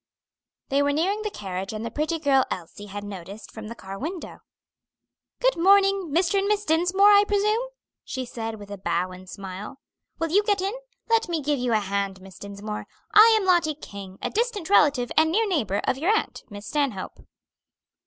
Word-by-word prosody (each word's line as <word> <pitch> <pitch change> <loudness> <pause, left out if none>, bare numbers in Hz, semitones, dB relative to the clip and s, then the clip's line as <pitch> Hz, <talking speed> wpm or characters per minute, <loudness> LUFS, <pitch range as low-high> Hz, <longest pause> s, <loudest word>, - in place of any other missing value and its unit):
They 275 +1 +2
were 285 0 +2
nearing 380 +8 0
the 425 - -2
carriage 190 - -5
and 215 +1 -5
the 230 - -4
pretty 310 +5 -1
girl 280 -4 +3
Elsie 185 +4 -6
had 205 +1 -6
noticed 200 +1 -9
from 220 -1 -8
the 230 - -7
car 195 -2 -8
window. 335 +4 -6 1.0
"Good - - +3
morning! 390 0 +4
Mr. 350 +5 +2
and 390 - 0
Miss 415 0 +1
Dinsmore, 355 +6 +4
I 405 0 +7
presume?" 425 +4 +1 0.4
she 260 -1 -4
said 225 -2 -5
with 205 -1 -11
a 200 - -6
bow 175 0 -1
and 185 0 -11
smile. 195 +5 -7 0.4
"Will 330 -1 -2
you 400 +4 +5
get 410 -1 +1
in? 390 +3 -1 0.3
Let 455 -3 +2
me 335 -2 0
give 290 -1 0
you 245 -1 0
a 215 - +4
hand, 200 -1 -2
Miss 190 0 -14
Dinsmore. 205 +1 -6 0.3
I 435 +2 +9
am 395 - -3
Lottie 345 -4 +3
King, 200 -8 -10
a - - -1
distant 425 -5 -1
relative 275 -9 +4
and 315 0 +4
near 440 +5 +2
neighbor 225 - 0
of 260 - 0
your 335 +6 0
aunt, 440 - -1
Miss 205 -1 -9
Stanhope." 270 -8 -2
285 Hz, 195 wpm, -25 LUFS, -, 1.0 s, I